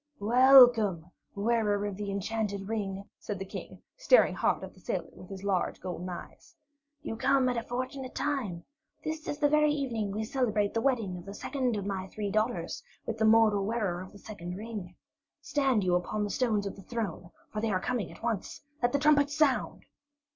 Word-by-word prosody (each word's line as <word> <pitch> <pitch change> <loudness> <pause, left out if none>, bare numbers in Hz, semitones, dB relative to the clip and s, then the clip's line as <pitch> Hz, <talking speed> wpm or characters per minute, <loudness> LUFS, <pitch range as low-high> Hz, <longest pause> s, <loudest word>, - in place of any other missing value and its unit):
"Welcome, 235 -7 +6 0.2
Wearer 205 -1 +1
of 205 -2 -3
the 205 0 -4
Enchanted 200 0 -2
Ring," 200 -3 -3
said 205 - -5
the 195 - -5
King, - - -9
staring - - +5
hard - - 0
at - - -8
the - - -19
sailor - - -3
with 185 - -13
his 195 -1 -8
large 195 -3 0
golden 180 0 -5
eyes. 175 - -10 0.5
"You - - -4
come 260 +2 +3
at 250 - -1
a 235 - 0
fortunate 255 +2 -5
time. 225 -13 -2 0.4
This 310 0 -4
very 300 0 +4
evening 240 -8 -1
we 215 +2 -2
celebrate 220 -4 0
the 225 - 0
wedding 225 -9 0
of 175 - -12
the 200 +1 -8
second 255 -4 -1
of 200 - -4
my 190 -2 -3
three 205 +1 -4
daughters 215 -5 -1 0.2
with 225 -1 -4
the 220 - +3
mortal 220 -2 +5
wearer 200 -5 -1
of 185 - -9
the - - -13
second 180 -4 -7
ring. 205 -4 -7 0.4
Stand 270 -7 +1
you 180 -1 +2
upon 180 +4 0
the 205 - -2
steps 220 -6 +1
of 200 - -4
the 195 - -11
throne, 195 -6 -4 0.2
for 215 - -3
they 225 - 0
are 185 -3 +1
coming 235 -3 -2
at - - -15
once. 230 +1 -3 0.2
Let 245 +1 +2
the - - +4
trumpets 290 -1 +3
sound!" 300 -4 +1
215 Hz, 190 wpm, -30 LUFS, 195-250 Hz, 0.5 s, Welcome